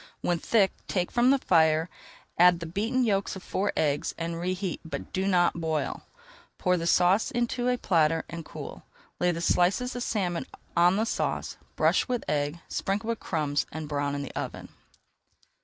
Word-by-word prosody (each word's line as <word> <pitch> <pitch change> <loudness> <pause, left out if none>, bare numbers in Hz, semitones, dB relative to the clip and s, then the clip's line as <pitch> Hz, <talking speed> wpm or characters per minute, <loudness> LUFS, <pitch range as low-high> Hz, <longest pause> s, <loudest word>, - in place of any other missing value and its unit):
When 175 -1 0
thick, 200 -1 +3 0.2
take 180 -2 -1
from 240 +1 +3
the 275 - +5
fire, 160 -7 +3 0.5
add 175 0 +6
the 170 - -5
beaten 220 +10 0
yolks 200 -4 0
of 190 - -9
four 200 +2 -1
eggs, 145 -1 0
and 165 0 -3
reheat 185 +1 -2
but 165 - -7
do 190 +1 0
not 175 -3 +2
boil. 160 -3 -1 0.6
Pour 180 -1 +2
the 170 -1 -2
sauce 180 +5 +4
into 240 +1 -1
a 250 - +1
platter, 165 -6 +2
and 170 -1 -7
cool. - - -9 0.4
Lay 180 - +3
the 170 -1 -1
slices 190 +9 +2
of 245 - -3
salmon 185 -8 -1 0.3
on 175 +2 +5
the 220 +2 +1
sauce, - - -2 0.2
brush - - +2
with 250 -2 -2
egg, 145 +1 0
sprinkle 205 +4 -2
with 230 - -1
crumbs 150 -4 -1
and 155 0 -5
brown 145 -1 -1
in 140 - -3
the 140 - -8
oven. - - -5
175 Hz, 175 wpm, -27 LUFS, 165-205 Hz, 0.6 s, add